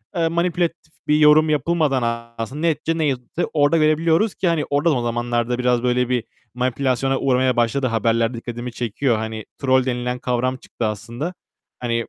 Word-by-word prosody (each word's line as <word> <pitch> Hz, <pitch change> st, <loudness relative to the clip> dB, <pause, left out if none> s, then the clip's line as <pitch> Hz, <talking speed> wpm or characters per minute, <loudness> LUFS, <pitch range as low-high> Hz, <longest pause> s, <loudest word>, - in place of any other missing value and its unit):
eee, 165 Hz, -2 st, +2 dB
manipülatif 170 Hz, -1 st, -1 dB
bir 150 Hz, -, +4 dB
yorum 155 Hz, +1 st, +6 dB
yapılmadan 135 Hz, -7 st, 0 dB
aslında 115 Hz, +7 st, -5 dB
neticede 165 Hz, 0 st, 0 dB
ne 160 Hz, -, +1 dB
yazıldıysa 135 Hz, +4 st, -2 dB
orada 145 Hz, +2 st, +3 dB
görebiliyoruz 160 Hz, +6 st, +2 dB
ki, 185 Hz, -, -1 dB
hani 165 Hz, -3 st, +1 dB
orada 145 Hz, +4 st, +2 dB
da -, -, +2 dB
o 125 Hz, -, 0 dB
zamanlarda 120 Hz, 0 st, -1 dB
biraz 125 Hz, -1 st, +1 dB
böyle 125 Hz, 0 st, +1 dB
bir 125 Hz, -3 st, 0 dB, 0.3 s
manipülasyona 130 Hz, +1 st, 0 dB
uğramaya 130 Hz, -1 st, +2 dB
başladı 120 Hz, +3 st, +1 dB
haberler 115 Hz, 0 st, +1 dB
dikkatimi 120 Hz, +1 st, -6 dB
çekiyor. 120 Hz, +1 st, -1 dB
Hani 110 Hz, 0 st, -5 dB
troll 130 Hz, -2 st, +2 dB
denilen 125 Hz, -1 st, -2 dB
kavram 125 Hz, +1 st, -1 dB
çıktı 120 Hz, -, -5 dB
aslında. 115 Hz, -, -4 dB, 0.5 s
Hani, 120 Hz, -1 st, -1 dB
130 Hz, 165 wpm, -21 LUFS, 120-155 Hz, 0.5 s, yorum